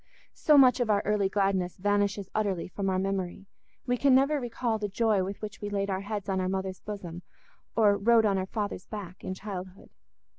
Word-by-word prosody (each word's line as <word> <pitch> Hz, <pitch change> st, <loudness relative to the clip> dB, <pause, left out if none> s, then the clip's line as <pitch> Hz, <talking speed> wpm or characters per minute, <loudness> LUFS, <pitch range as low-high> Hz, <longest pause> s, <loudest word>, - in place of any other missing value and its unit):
So 300 Hz, -2 st, +4 dB
much 260 Hz, -2 st, +6 dB
of 240 Hz, -3 st, 0 dB
our 205 Hz, -1 st, +3 dB
early 205 Hz, -2 st, +1 dB
gladness 195 Hz, -2 st, 0 dB
vanishes 205 Hz, 0 st, 0 dB
utterly 200 Hz, -5 st, -1 dB
from 195 Hz, +1 st, -3 dB
our 185 Hz, -, +1 dB
memory: 195 Hz, 0 st, -2 dB, 0.4 s
we 245 Hz, 0 st, 0 dB
can 270 Hz, 0 st, +4 dB
never 280 Hz, +3 st, +3 dB
recall 235 Hz, -2 st, -2 dB
the 205 Hz, -1 st, -2 dB
joy 210 Hz, -1 st, +2 dB
with 195 Hz, +2 st, -5 dB
which 210 Hz, -1 st, -7 dB
we 205 Hz, -, -3 dB
laid 200 Hz, -1 st, -1 dB
our 190 Hz, 0 st, -1 dB
heads 205 Hz, -1 st, -4 dB
on 190 Hz, -1 st, 0 dB
our 185 Hz, -, -1 dB
mother's 190 Hz, 0 st, -3 dB
bosom 180 Hz, -5 st, -7 dB, 0.5 s
or 210 Hz, -3 st, +4 dB
rode 225 Hz, +2 st, +4 dB
on 195 Hz, -2 st, +2 dB
our 185 Hz, -, -3 dB
father's 205 Hz, -3 st, -4 dB
back 195 Hz, -4 st, -8 dB
in 185 Hz, -, -4 dB
childhood. 185 Hz, -2 st, -8 dB
200 Hz, 200 wpm, -28 LUFS, 190-215 Hz, 0.5 s, much